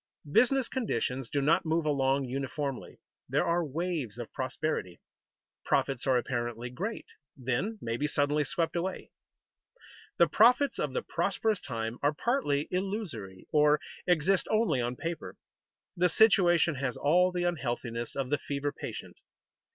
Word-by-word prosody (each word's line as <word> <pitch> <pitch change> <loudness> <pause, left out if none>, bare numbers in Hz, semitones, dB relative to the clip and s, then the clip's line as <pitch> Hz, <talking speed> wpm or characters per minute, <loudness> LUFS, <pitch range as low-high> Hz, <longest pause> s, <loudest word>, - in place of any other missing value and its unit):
Business 255 - +4
conditions 130 - -2
do 140 - 0
not 160 +4 +3
move 160 0 0
along 135 -2 +1
uniformly. 135 +1 -4 0.3
There - - +2
are 170 +1 +1
waves 155 - -3
of 120 -2 -7
prosperity. 130 - -3 0.6
Profits 135 -2 0
are 130 -1 +4
apparently 120 -1 -3
great, 200 - -4 0.3
then 130 - -2
may 115 0 -2
be 150 - 0
suddenly 150 0 +1
swept 165 +4 -1
away. 180 +2 -3 1.1
The 170 - +7
profits 245 - +4
of - - -1
the 480 - -1
prosperous 220 -4 0
time 115 -2 -4
are 145 +1 +2
partly 150 - 0
illusory, 180 - -4
or 150 0 +5 0.3
exist 180 +2 +3
only 215 - +2
on 120 +1 -2
paper. 165 +5 -5 0.6
The 180 +1 +3
situation 175 -6 +5
has 125 -3 -2
all 180 +5 +3
the 180 -1 -2
unhealthiness 120 -8 -2
of 135 -1 -3
the 145 - +2
fever 145 0 -3
patient. - - -8
150 Hz, 140 wpm, -30 LUFS, 130-180 Hz, 1.1 s, The